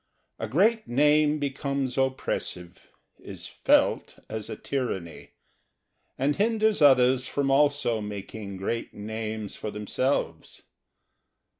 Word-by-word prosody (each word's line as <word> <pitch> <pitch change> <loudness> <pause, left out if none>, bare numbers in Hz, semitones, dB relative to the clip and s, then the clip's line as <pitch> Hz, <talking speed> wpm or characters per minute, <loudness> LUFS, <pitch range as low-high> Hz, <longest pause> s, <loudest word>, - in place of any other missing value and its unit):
A 110 - -3
great 215 - +2
name 150 +3 +3
becomes 140 -2 -2
oppressive, 130 -9 -3 0.3
is - - -9
felt - - +1
as 110 -2 -5
a - - -4
tyranny, 95 - -4 0.8
and 140 +2 +1
hinders 220 -2 +2
others 130 -2 +5
from 140 -1 0
also 145 -5 +2
making 100 -1 -7
great 115 +5 -3
names 110 0 -5
for 110 - -5
themselves. 105 +6 -2
130 Hz, 105 wpm, -27 LUFS, 110-145 Hz, 0.8 s, others